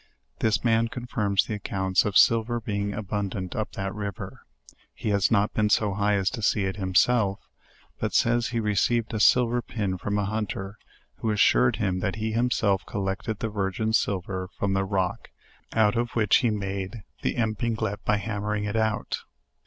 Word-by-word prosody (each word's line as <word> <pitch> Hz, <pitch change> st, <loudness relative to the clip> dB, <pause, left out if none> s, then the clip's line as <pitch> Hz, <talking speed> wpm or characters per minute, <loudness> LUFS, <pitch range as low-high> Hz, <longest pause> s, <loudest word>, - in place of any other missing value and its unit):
This 110 Hz, -1 st, +1 dB
man 115 Hz, -1 st, +3 dB
confirms 110 Hz, -5 st, 0 dB
the -, -, -4 dB
accounts 95 Hz, -2 st, 0 dB
of 105 Hz, -2 st, +2 dB
silver 115 Hz, +1 st, +4 dB
being 100 Hz, -2 st, -2 dB
abundant 100 Hz, -3 st, -3 dB
up 110 Hz, -2 st, -3 dB
that 95 Hz, 0 st, -3 dB
river: 100 Hz, -2 st, -6 dB, 0.5 s
he -, -, -3 dB
has 100 Hz, -3 st, +2 dB
not 105 Hz, -2 st, +2 dB
been 105 Hz, -1 st, +1 dB
so 105 Hz, -1 st, +2 dB
high 105 Hz, +1 st, +1 dB
as 95 Hz, -1 st, +1 dB
to 120 Hz, -, -5 dB
see 105 Hz, -1 st, +2 dB
it 95 Hz, +1 st, -3 dB
himself,, 100 Hz, +2 st, +2 dB, 0.6 s
but -, -, -2 dB
says, 120 Hz, 0 st, +3 dB
he 120 Hz, -1 st, -2 dB
received 110 Hz, +2 st, +1 dB
a 110 Hz, -, -1 dB
silver 120 Hz, +3 st, +4 dB
pin 100 Hz, -5 st, -3 dB
from 100 Hz, +2 st, -2 dB
a 105 Hz, -, 0 dB
hunter, 105 Hz, -1 st, -4 dB, 0.4 s
who 110 Hz, -, -2 dB
assured 110 Hz, +3 st, +4 dB
him 95 Hz, -5 st, -1 dB
that 95 Hz, 0 st, -1 dB
he 110 Hz, 0 st, -2 dB
himself 110 Hz, -4 st, +1 dB
collected 100 Hz, +2 st, -3 dB
the 115 Hz, -, -3 dB
virgin 105 Hz, +1 st, -1 dB
silver 95 Hz, -3 st, -1 dB
from 100 Hz, -1 st, 0 dB
the 95 Hz, 0 st, +1 dB
rock, 95 Hz, -2 st, -2 dB, 0.4 s
out 110 Hz, -2 st, +3 dB
of 120 Hz, +1 st, 0 dB
which 105 Hz, -3 st, +4 dB
he 120 Hz, -, +2 dB
made 100 Hz, 0 st, -4 dB, 0.2 s
the -, -, -1 dB
epinglete 110 Hz, -2 st, -1 dB
by 105 Hz, -, +2 dB
hammering 105 Hz, 0 st, -2 dB
it 105 Hz, +1 st, -3 dB
out. 110 Hz, -1 st, 0 dB
105 Hz, 175 wpm, -26 LUFS, 100-110 Hz, 0.6 s, silver